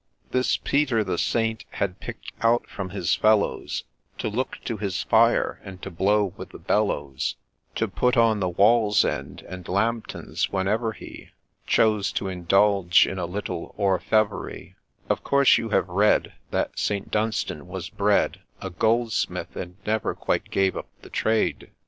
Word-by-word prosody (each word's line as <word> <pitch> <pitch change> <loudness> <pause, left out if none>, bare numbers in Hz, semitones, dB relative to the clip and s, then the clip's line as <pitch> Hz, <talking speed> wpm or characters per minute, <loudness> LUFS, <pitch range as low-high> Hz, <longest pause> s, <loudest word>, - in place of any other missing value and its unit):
This 130 0 +2
Peter 135 -6 +1
the 95 - -2
Saint 115 -1 0
had 95 -1 -3
pick'd - - -8
out 115 +1 +3
from 95 -2 -6
his 90 +1 0
fellows, 110 -1 +1 0.3
To - - -2
look 125 +5 -2
to 115 - -2
his 100 -4 -2
fire, - - +3
and 95 -1 -9
to 100 - -5
blow 100 +2 +2
with - - -9
the - - -11
bellows, 70 -10 -1 0.4
To - - 0
put 125 +1 +1
on 115 -2 +4
the 95 -2 0
Wall's 105 +3 +4
Ends 70 -2 -4
and 90 0 -8
Lambtons 110 +4 -1
whenever 105 +4 0
he - - -11 0.4
Chose 105 -3 +3
to 95 - -2
indulge 95 +1 +4
in 95 - -4
a 85 - -2
little 90 -2 -5
orfevrerie, 105 +2 0 0.2
— - - -36
Of - - -1
course 140 -1 +5
you 115 - -4
have 105 - +2
read, 100 +4 +2 0.2
That - - -2
St. 100 -1 -2
Dunstan 105 -8 -1
was 90 0 -6
bred 100 0 +1 0.2
A 95 - -6
Goldsmith, 115 +4 0
and 90 0 -6
never 110 +1 0
quite - - -1
gave 95 -1 +1
up - - -5 0.2
the - - -13
trade 110 0 0
100 Hz, 160 wpm, -25 LUFS, 95-110 Hz, 0.4 s, course